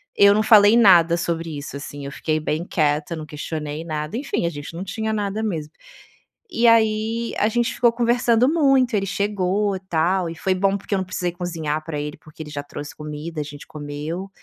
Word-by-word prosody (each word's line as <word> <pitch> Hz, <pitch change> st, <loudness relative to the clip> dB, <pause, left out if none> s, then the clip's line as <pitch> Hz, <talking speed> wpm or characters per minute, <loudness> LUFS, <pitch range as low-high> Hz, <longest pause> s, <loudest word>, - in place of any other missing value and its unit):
eu 200 Hz, 0 st, +6 dB
não 215 Hz, -, +2 dB
falei 215 Hz, 0 st, +7 dB
nada 175 Hz, -6 st, +6 dB
sobre 165 Hz, -3 st, -3 dB
isso, 140 Hz, 0 st, -7 dB
assim. 140 Hz, 0 st, -8 dB
Eu 140 Hz, -, -6 dB
fiquei 155 Hz, +2 st, -1 dB
bem 155 Hz, +1 st, -2 dB
quieta, 155 Hz, -2 st, 0 dB
eu -, -, -4 dB
não 155 Hz, -, -6 dB
questionei 150 Hz, 0 st, -5 dB
nada, 155 Hz, +1 st, -4 dB
enfim, 265 Hz, -9 st, -2 dB
a -, -, +1 dB
gente 145 Hz, 0 st, -8 dB
não 175 Hz, -, -4 dB
tinha 220 Hz, +3 st, -3 dB
nada 210 Hz, 0 st, -2 dB
mesmo. 160 Hz, -9 st, -3 dB, 0.8 s
E 240 Hz, -9 st, +2 dB
aí, 225 Hz, 0 st, +2 dB
a 210 Hz, -, +3 dB
gente 235 Hz, +1 st, 0 dB
ficou 240 Hz, -1 st, +3 dB
conversando 240 Hz, 0 st, +2 dB
muito. 270 Hz, -6 st, +3 dB
Ele 195 Hz, -1 st, +1 dB
chegou 200 Hz, 0 st, 0 dB
e -, -, -5 dB
tal. 175 Hz, +2 st, +1 dB
E 165 Hz, -, -7 dB
foi 190 Hz, +3 st, 0 dB
bom 195 Hz, +1 st, +1 dB
porque 200 Hz, -, -6 dB
eu -, -, +3 dB
não 190 Hz, -, -2 dB
precisei 180 Hz, -1 st, -2 dB
cozinhar 165 Hz, -4 st, -3 dB
pra 155 Hz, -2 st, -4 dB
ele 150 Hz, +1 st, -5 dB
porque 155 Hz, +1 st, -11 dB
ele 150 Hz, -, -11 dB
já 145 Hz, -1 st, -4 dB
trouxe 145 Hz, 0 st, -8 dB
comida, 150 Hz, +1 st, -6 dB
a -, -, -2 dB
gente 145 Hz, 0 st, -10 dB
comeu. 150 Hz, +5 st, -6 dB
175 Hz, 210 wpm, -22 LUFS, 155-215 Hz, 0.8 s, falei